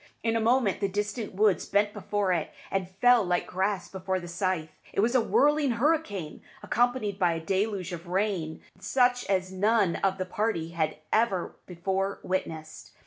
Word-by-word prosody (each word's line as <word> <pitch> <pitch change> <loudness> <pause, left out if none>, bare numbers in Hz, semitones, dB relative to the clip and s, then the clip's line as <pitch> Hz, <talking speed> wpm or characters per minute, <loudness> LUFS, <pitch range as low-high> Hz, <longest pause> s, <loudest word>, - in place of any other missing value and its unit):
In 225 0 +1
a - - +2
moment 230 -2 +2
the 200 - +1
distant 205 +1 -3
woods 205 -4 +2
bent 205 +1 +2
before 205 -3 0
it, 165 -3 -1 0.2
and 190 -2 -1
fell 235 +5 +4
like 180 -1 0
grass 190 +1 -1
before 190 0 -3
the 175 - -8
scythe. 170 -2 -2 0.2
It - - -2
was 230 +4 +3
a 255 - +5
whirling 290 +2 +3
hurricane, 230 - -1 0.2
accompanied 240 -4 0
by 175 -2 +3
a 165 - -3
deluge 190 +1 -1
of 170 +1 -7
rain 180 -4 -1 0.2
such 245 -1 +2
as 185 -1 0
none 200 -1 +2
of 190 -1 0
the 185 - -2
party 185 -4 -1
had 160 -2 -1 0.2
ever 215 -5 +1
before 190 +2 -2
witnessed. 160 -4 -4
195 Hz, 170 wpm, -28 LUFS, 180-220 Hz, 0.2 s, a